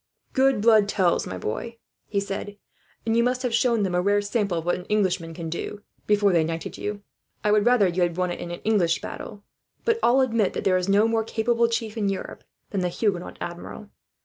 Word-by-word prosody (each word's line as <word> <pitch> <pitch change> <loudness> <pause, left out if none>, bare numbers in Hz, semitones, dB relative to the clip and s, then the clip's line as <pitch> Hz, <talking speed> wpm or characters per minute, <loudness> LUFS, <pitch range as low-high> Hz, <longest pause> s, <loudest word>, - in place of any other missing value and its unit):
"Good 265 -4 +3
blood 215 -2 +5
tells, 185 -4 +1
my 95 - -5
boy," 230 - -4 0.3
he 200 - 0
said; 200 +1 -5 0.5
"and 225 0 +1
you 235 - +4
must 250 +1 0
have 245 -2 -1
shown 230 -2 +2
them 185 -2 -1
a 180 - +2
rare 205 +2 +3
sample 205 -4 0
of 165 - -4
what 175 - +2
an 180 - -4
Englishman 185 -6 0
can 165 -1 -5
do, 185 +5 -5 0.2
before 205 -2 +3
they 165 -2 +4
knighted 165 0 -4
you. 205 -1 -5 0.4
I 210 - +2
would 210 +1 +3
rather 240 -5 +5
you 180 +1 -1
had 175 -1 +1
won 180 -1 0
it - - -5
in 175 - -6
an 175 - -6
English 195 -6 +2
battle, 205 -1 -8 0.4
but 460 -1 +2
all 255 +3 +4
admit 230 -6 +1
that - - -3
there 185 - +3
is 180 +1 -2
no 205 +3 +4
more 225 -1 +1
capable 230 +1 +1
chief 230 -1 -3
in 205 -2 +1
Europe 195 - -5 0.3
than 195 - -1
the 180 - 0
Huguenot 180 -1 -2
Admiral. 175 +4 -7
205 Hz, 225 wpm, -25 LUFS, 180-225 Hz, 0.5 s, blood